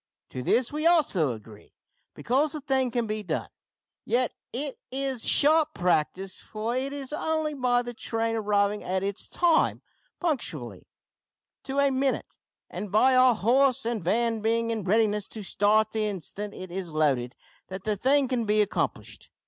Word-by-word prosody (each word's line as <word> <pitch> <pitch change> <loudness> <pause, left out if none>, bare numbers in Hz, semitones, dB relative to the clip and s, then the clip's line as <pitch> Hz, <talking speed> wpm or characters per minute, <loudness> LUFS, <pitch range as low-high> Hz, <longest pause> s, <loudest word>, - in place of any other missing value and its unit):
To 130 - -5
this 240 - +1
we 305 +2 +1
also 240 - +3
agree, 105 -1 -14 0.4
because 275 +5 +1
the 305 - -5
thing 265 -2 +1
can 235 0 -1
be 215 0 -3
done; 170 -6 -3 0.5
yet 245 0 0 0.2
it 275 +3 -4
is 265 -2 -2
sharp 310 +1 +3
practice, 180 +2 0
for 220 +3 -4
it 265 +2 -2
is 280 0 -6
only 315 0 -1
by 250 -3 +1
the 240 0 -6
train 225 0 -2
arriving 205 -1 +1
at 185 +1 -1
its 200 0 -4
time, 340 -2 +2 0.4
punctually 155 - -3 0.8
to 270 +1 -4
a 280 -1 +4
minute, 265 0 -1 0.3
and 210 - -6
by 255 +5 +4
our 255 -1 +6
horse 250 +5 +2
and 230 -5 -2
van 225 +4 +1
being 230 +1 +1
in 220 -3 -2
readiness 210 0 +2
to 215 - -8
start 215 +2 +2
the 215 -1 0
instant 200 +2 -6
it 185 -1 -8
is 180 -2 -5
loaded, 140 -6 +1 0.3
that 190 0 -7
the 215 0 0
thing 270 +6 +3
can 240 -3 -1
be 210 +1 +3
accomplished. 205 - -4
225 Hz, 165 wpm, -27 LUFS, 200-265 Hz, 0.8 s, our